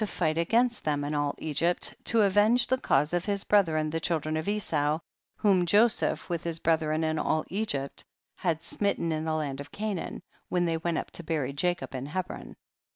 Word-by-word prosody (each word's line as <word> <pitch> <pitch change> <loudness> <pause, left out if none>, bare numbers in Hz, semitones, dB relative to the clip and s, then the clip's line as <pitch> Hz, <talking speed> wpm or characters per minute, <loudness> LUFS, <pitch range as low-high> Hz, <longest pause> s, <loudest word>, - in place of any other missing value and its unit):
fight 160 -3 0
against 230 +9 +2
them 145 -2 0
and 145 +1 -2
all 145 -1 0
Egypt, 165 +3 0
to 230 -2 +4
avenge 205 +5 +4
the 260 - +1
cause 150 - +2
of 175 0 0
his 200 -1 -1
brethren 160 -7 +2
the 165 - -1
children 155 -2 -1
of 155 +2 -3
Esau, 155 -8 +1 0.4
whom 195 -4 +3
Joseph 210 +6 +2
with 170 -2 -3
his 170 -1 -2
brethren 160 -1 +1
and 155 0 0
all 155 - 0
Egypt 180 -9 -2 0.3
had 165 -3 -1
smit 200 +3 -1
ten 165 - -1
in 155 0 -2
the 160 -1 0
land 145 -3 -2
of 140 - -8
Canaan, 210 -4 -4 0.3
when 175 -1 +1
they 165 -1 0
went 165 0 -1
up - - -4
to 170 - -7
bury 150 -4 -1
Jacob 175 +3 -1
in 130 +1 -4
Hebron. 185 +4 -5
165 Hz, 195 wpm, -28 LUFS, 155-195 Hz, 0.4 s, to